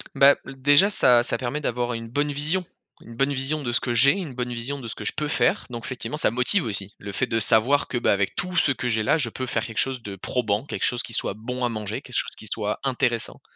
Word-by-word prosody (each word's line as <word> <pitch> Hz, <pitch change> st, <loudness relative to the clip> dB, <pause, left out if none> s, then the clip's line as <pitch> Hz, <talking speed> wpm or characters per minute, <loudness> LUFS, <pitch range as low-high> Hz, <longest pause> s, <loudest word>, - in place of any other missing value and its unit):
Bah, 140 Hz, +1 st, +7 dB
heu, 135 Hz, -, -8 dB
déjà 145 Hz, +9 st, +5 dB
ça 125 Hz, -11 st, +5 dB
ça -, -, -2 dB
permet 130 Hz, +4 st, -3 dB
d'avoir 125 Hz, -3 st, -1 dB
une 115 Hz, 0 st, -6 dB
bonne 145 Hz, +5 st, 0 dB
vision. 155 Hz, +6 st, -1 dB, 0.4 s
Une 115 Hz, 0 st, -12 dB
bonne 135 Hz, +3 st, +2 dB
vision 140 Hz, +3 st, -1 dB
de 120 Hz, -, -2 dB
ce 120 Hz, -, +4 dB
que 120 Hz, -, -2 dB
j'ai, 130 Hz, +4 st, +6 dB
une 180 Hz, -9 st, -5 dB
bonne 125 Hz, 0 st, -3 dB
vision 125 Hz, +4 st, -4 dB
de 120 Hz, -, -7 dB
ce -, -, -6 dB
que -, -, -7 dB
je -, -, -1 dB
peux 150 Hz, 0 st, -1 dB
faire, 180 Hz, +6 st, +1 dB
donc 120 Hz, -1 st, -6 dB
effectivement 130 Hz, +3 st, -4 dB
ça 150 Hz, -, +1 dB
motive 125 Hz, -, +2 dB
aussi, 100 Hz, -3 st, -3 dB
le 100 Hz, 0 st, -7 dB
fait 130 Hz, +5 st, -1 dB
de 115 Hz, -, +1 dB
savoir 120 Hz, +5 st, +3 dB
que, -, -, -4 dB
bah, 120 Hz, -, +2 dB
avec 100 Hz, -1 st, 0 dB
tout 180 Hz, +1 st, -3 dB
ce 145 Hz, -, +4 dB
que 125 Hz, -1 st, -3 dB
j'ai 110 Hz, -2 st, 0 dB
là, 105 Hz, -, +3 dB
je 135 Hz, -6 st, -1 dB
peux 130 Hz, +3 st, -5 dB
faire 110 Hz, -3 st, -1 dB
quelque 115 Hz, -1 st, -6 dB
chose 130 Hz, -2 st, -1 dB
de 100 Hz, -3 st, -7 dB
probant, 110 Hz, +1 st, -1 dB
quelque -, -, -5 dB
chose 125 Hz, 0 st, 0 dB
qui 115 Hz, -, -8 dB
soit 100 Hz, -, -1 dB
bon 125 Hz, +3 st, -4 dB
à -, -, +2 dB
manger, 110 Hz, -3 st, -4 dB
quelque -, -, -6 dB
chose -, -, -1 dB
qui 110 Hz, -, -8 dB
soit 105 Hz, 0 st, -2 dB
intéressant. 125 Hz, -3 st, -1 dB
125 Hz, 275 wpm, -24 LUFS, 115-140 Hz, 0.4 s, Bah